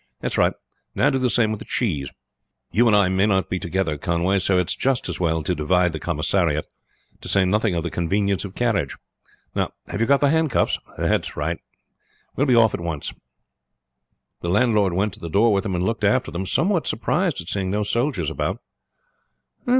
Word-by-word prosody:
That's -, -, -3 dB
right; -, -, +3 dB, 0.4 s
now -, -, +3 dB
do 135 Hz, -, 0 dB
the 130 Hz, -1 st, +1 dB
same 115 Hz, -3 st, +2 dB
with 110 Hz, -, -3 dB
the -, -, -9 dB
cheese. 75 Hz, -, -1 dB, 0.6 s
You 120 Hz, +3 st, +3 dB
and 110 Hz, -, +5 dB
I 100 Hz, -2 st, +4 dB
may 95 Hz, +2 st, +2 dB
not 95 Hz, -2 st, +1 dB
be 90 Hz, -, 0 dB
together, 85 Hz, -4 st, -2 dB
Conway, 85 Hz, +5 st, +1 dB
so 95 Hz, 0 st, +2 dB
it's 90 Hz, -2 st, 0 dB
just 135 Hz, -2 st, 0 dB
as -, -, -4 dB
well 80 Hz, -3 st, 0 dB
to -, -, 0 dB
divide 90 Hz, +4 st, +2 dB
the 80 Hz, -, -5 dB
commissariat; 80 Hz, -1 st, 0 dB, 0.6 s
to -, -, -8 dB
say 100 Hz, -1 st, +3 dB
nothing 105 Hz, 0 st, +1 dB
of 85 Hz, -, -1 dB
the 85 Hz, -, -3 dB
convenience 100 Hz, +3 st, 0 dB
of 100 Hz, -2 st, -8 dB
carriage. 110 Hz, -, 0 dB, 0.6 s
Now, -, -, 0 dB, 0.2 s
have 100 Hz, -, -3 dB
you 115 Hz, -, +2 dB
got 140 Hz, +1 st, +4 dB
the 140 Hz, -1 st, +3 dB
handcuffs? 160 Hz, -5 st, +1 dB, 0.2 s
That's -, -, 0 dB
right, 80 Hz, +3 st, -2 dB, 0.8 s
we -, -, -3 dB
will 145 Hz, -, +3 dB
be 125 Hz, -, +4 dB
off 115 Hz, -2 st, +5 dB
at -, -, -3 dB
once." 80 Hz, -4 st, -3 dB, 1.3 s
The 85 Hz, -, -4 dB
landlord 105 Hz, -2 st, +3 dB
went 100 Hz, +2 st, 0 dB
to -, -, -11 dB
the 85 Hz, -, -6 dB
door 105 Hz, +6 st, +3 dB
with 100 Hz, -, +2 dB
them 95 Hz, -4 st, -1 dB
and 90 Hz, -, -1 dB
looked 115 Hz, +2 st, -2 dB
after 105 Hz, -3 st, +2 dB
them, 90 Hz, +3 st, -4 dB
somewhat 175 Hz, -, +1 dB
surprised 170 Hz, -, 0 dB
at 85 Hz, -, -8 dB
seeing 95 Hz, -1 st, -1 dB
no 105 Hz, +2 st, 0 dB
soldiers 105 Hz, -, -1 dB
about. 75 Hz, -, -2 dB
95 Hz, 205 wpm, -22 LUFS, 85-115 Hz, 1.3 s, and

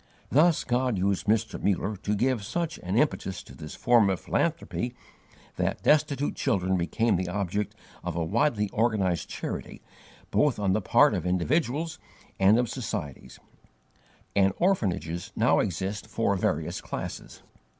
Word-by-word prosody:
Thus 160 Hz, +3 st, +4 dB
God 125 Hz, -3 st, 0 dB
used 95 Hz, +2 st, 0 dB
Mr. 110 Hz, +1 st, +1 dB
Muller 100 Hz, +1 st, 0 dB
to 105 Hz, +2 st, -2 dB
give 120 Hz, 0 st, +1 dB
such 165 Hz, +9 st, -3 dB
an 95 Hz, +4 st, -2 dB
impetus 95 Hz, -10 st, 0 dB
to -, -, -14 dB
this 75 Hz, +3 st, -9 dB
form 115 Hz, -4 st, +4 dB
of 95 Hz, -3 st, 0 dB
philanthropy, 120 Hz, +9 st, -1 dB, 0.6 s
that -, -, -1 dB
destitute 145 Hz, -1 st, +2 dB
children 95 Hz, -3 st, 0 dB
became 100 Hz, +5 st, +1 dB
the 90 Hz, 0 st, -2 dB
object 100 Hz, +2 st, -2 dB, 0.3 s
of 90 Hz, -2 st, -3 dB
a 85 Hz, -1 st, 0 dB
widely 110 Hz, -, +1 dB
organized 100 Hz, -7 st, 0 dB
charity -, -, -5 dB, 0.5 s
both 150 Hz, -4 st, +3 dB
on 100 Hz, -3 st, +1 dB
the 110 Hz, -, +1 dB
part -, -, +5 dB
of -, -, -2 dB
individuals 145 Hz, -, 0 dB, 0.4 s
and 100 Hz, +3 st, +6 dB
of 120 Hz, 0 st, +2 dB
societies, 70 Hz, -, -5 dB, 1.0 s
and 95 Hz, -1 st, +4 dB
orphanages 90 Hz, -, 0 dB
now -, -, +3 dB
exist 95 Hz, +4 st, -2 dB
for 105 Hz, -3 st, 0 dB
various 95 Hz, -, -1 dB
classes. -, -, -7 dB
105 Hz, 140 wpm, -27 LUFS, 95-125 Hz, 1.0 s, and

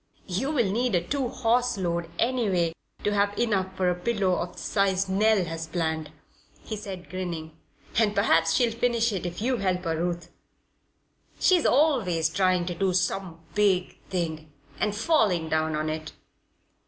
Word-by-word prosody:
"You'll 250 Hz, -, -2 dB
need 225 Hz, +2 st, 0 dB
a 175 Hz, -, +3 dB
two 275 Hz, -2 st, 0 dB
horse 245 Hz, -1 st, +1 dB
load, 170 Hz, -2 st, -2 dB
anyway 205 Hz, -9 st, +1 dB, 0.3 s
to 205 Hz, -, +1 dB
have 205 Hz, 0 st, +1 dB
enough 190 Hz, -5 st, 0 dB
for 185 Hz, -, +1 dB
a 180 Hz, -, +3 dB
pillow 190 Hz, +1 st, 0 dB
of 175 Hz, 0 st, -3 dB
the -, -, -20 dB
size 195 Hz, -1 st, +1 dB
Nell 200 Hz, 0 st, +3 dB
has 165 Hz, 0 st, -5 dB
planned," 160 Hz, -2 st, -2 dB, 0.5 s
he 220 Hz, -, -5 dB
said, 195 Hz, -4 st, -7 dB
grinning. 170 Hz, -4 st, -5 dB, 0.4 s
"And 210 Hz, -2 st, +2 dB
perhaps 165 Hz, -5 st, +3 dB
she'll 240 Hz, -3 st, +3 dB
finish 235 Hz, -1 st, +1 dB
it 180 Hz, -2 st, -2 dB
if 175 Hz, +4 st, -5 dB
you 255 Hz, +1 st, +1 dB
help 185 Hz, -3 st, 0 dB
her, 165 Hz, -2 st, -1 dB
Ruth. 175 Hz, +1 st, -3 dB, 1.1 s
She's 360 Hz, -3 st, +4 dB
always 225 Hz, -, +3 dB
trying 185 Hz, 0 st, +2 dB
to 175 Hz, -, -3 dB
do 185 Hz, +1 st, 0 dB
some 185 Hz, -2 st, -1 dB
big 195 Hz, -3 st, +1 dB
thing 160 Hz, -4 st, -3 dB, 0.3 s
and 210 Hz, -1 st, 0 dB
'falling 210 Hz, -, +2 dB
down' 155 Hz, 0 st, +1 dB
on 155 Hz, +1 st, -1 dB
it." 155 Hz, 0 st, -4 dB
190 Hz, 160 wpm, -26 LUFS, 170-220 Hz, 1.1 s, She's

